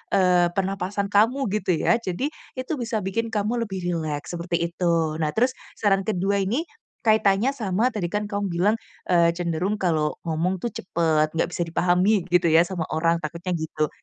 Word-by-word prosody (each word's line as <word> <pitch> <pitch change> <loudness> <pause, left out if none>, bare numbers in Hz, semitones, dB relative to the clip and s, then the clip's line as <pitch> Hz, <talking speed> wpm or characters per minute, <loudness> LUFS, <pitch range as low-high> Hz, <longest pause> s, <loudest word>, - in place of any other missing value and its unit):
eee, 180 -2 +4
pernapasan 195 +1 -2
kamu 230 +7 +3 0.2
gitu 180 -2 +1
ya, 230 +8 +2
jadi 230 - -3 0.2
itu 255 +3 -5
bisa 225 -3 -2
bikin 230 +5 -1
kamu 220 +2 -1
lebih 190 -2 -5
rileks 160 -4 -3
seperti 170 0 -2
itu. 165 -3 0
Nah 155 -2 0
terus 250 +4 +3 0.2
saran 195 -2 +2
kedua 200 0 +1
ini 215 +11 0 0.4
kaitannya 215 +2 +3
sama 230 -1 0
tadi 200 -6 -2
kan 210 0 -1
kamu 200 0 -1
bilang, 185 +6 +2 0.4
eee, 170 -1 +5
cenderung 175 +3 -1
kalau 155 -4 +1
ngomong 170 +4 0
tuh 240 - -1
cepet, 160 -3 +1
nggak 165 - +1
bisa 175 - -1
dipahami 180 +4 +2
gitu 180 -1 +4
ya, 165 +1 +6
sama 175 -4 -3
orang 165 +1 +2
takutnya 170 +4 -4
gitu. 155 -1 -1
185 Hz, 170 wpm, -24 LUFS, 170-210 Hz, 0.4 s, ya